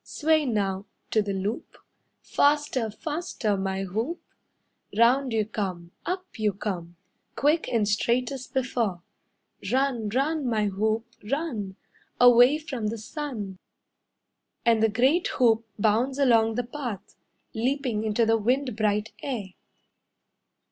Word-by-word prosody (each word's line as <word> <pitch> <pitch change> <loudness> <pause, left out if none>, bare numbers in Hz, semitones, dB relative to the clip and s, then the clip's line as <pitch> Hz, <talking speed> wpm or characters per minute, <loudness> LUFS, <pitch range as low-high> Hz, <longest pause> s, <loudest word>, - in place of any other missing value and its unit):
Sway 310 0 +1
now 200 -3 -1 0.2
to 220 - +4
the 205 -1 -3
loop, 195 +4 -4 0.5
Faster, 285 -5 +2
faster, 240 - -2
my 190 0 -2
hoop. 225 - -3 0.8
Round 250 +3 +4
you 220 -1 +1
come, 185 -5 -4 0.2
Up 370 -7 -4
you 210 -2 +1
come, 180 -4 -5 0.4
Quick 305 +3 +2
and 220 -3 +1
straight 235 +5 +1
as 260 -2 -6
before. 235 -9 -1 0.7
Run, 255 -5 +1
run, 280 +5 0
my 220 -3 +1
hoop, 215 +3 0 0.2
run, 245 - -2 0.4
Away 245 +3 +7
from 265 -8 -4
the 225 +2 -3
sun." 215 -5 -6 1.1
And 230 -2 +4
the 225 - +4
great 260 +11 +3
hoop 230 -3 +3
bounds 230 +6 +2
along 230 -5 +4
the 245 - 0
path, 240 -6 -6 0.4
Leaping 245 -2 -1
into 220 +1 +2
the 225 0 +3
wind 250 +2 0
bright 210 0 0
air. 230 -9 -4
230 Hz, 125 wpm, -26 LUFS, 210-265 Hz, 1.1 s, Away